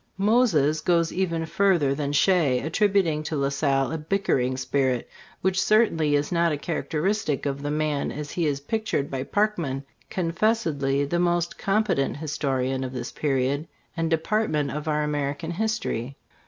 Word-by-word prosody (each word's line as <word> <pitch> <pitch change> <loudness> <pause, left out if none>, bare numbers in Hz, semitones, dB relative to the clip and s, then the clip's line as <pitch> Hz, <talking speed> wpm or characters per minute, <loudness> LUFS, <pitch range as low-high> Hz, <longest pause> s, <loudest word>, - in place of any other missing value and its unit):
Moses* 190 - +3
goss 170 -1 +2
even 170 -3 -1
further 170 -5 +2
than 140 0 -2
Shea, 145 -4 +3
attributing 185 -2 +1
to 155 +1 -4
La 140 -1 +1
Salle 135 -2 +1
a 160 - -3
bickering 150 -7 0
spirit, 130 -1 0 0.3
which 190 0 +1
certainly 165 -9 +3
is 145 0 0
not 170 -1 +2
a 150 - -1
characteristic 165 +1 -1
of 140 0 -2
the 145 - -3
man 150 -1 -1
as 145 0 -6
he 170 -3 0
is 140 -1 -1
pictured 215 -4 -2
by 135 -1 -2
Parkman, 165 -6 -1 0.3
confessedly 165 -7 0
the 170 +5 -1
most 175 -1 0
competent 195 -10 +1
historian 135 -3 -1
of 130 0 -5
this 125 -2 -5
period 140 +1 0 0.3
and 165 -1 -1
de 165 - +3
partment 160 -6 0
of 150 +1 -5
our 150 -1 +1
American 145 +2 -2
history. 175 - -2
155 Hz, 155 wpm, -25 LUFS, 140-180 Hz, 0.3 s, Moses